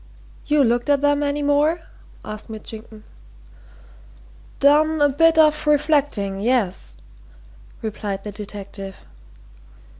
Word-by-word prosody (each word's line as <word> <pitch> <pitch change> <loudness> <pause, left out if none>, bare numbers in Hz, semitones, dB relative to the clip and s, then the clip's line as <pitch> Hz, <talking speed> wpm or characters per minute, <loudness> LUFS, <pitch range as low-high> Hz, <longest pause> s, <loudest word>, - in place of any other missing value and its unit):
"You 295 -1 +3
looked 240 +2 0
at 285 -1 +2
'em 290 0 +2
any 290 0 -1
more?" 295 +4 +2 0.4
asked 215 +1 -8
Mitchington. 220 0 -10 1.6
"Done 305 +3 +4
a 290 0 +4
bit 330 +4 +3
of 305 -1 +3
reflecting 285 -10 +1
yes," 215 -4 -1 0.9
replied 205 -2 -4
the 210 - -5
detective. 200 -1 -9
275 Hz, 100 wpm, -21 LUFS, 210-295 Hz, 1.6 s, Done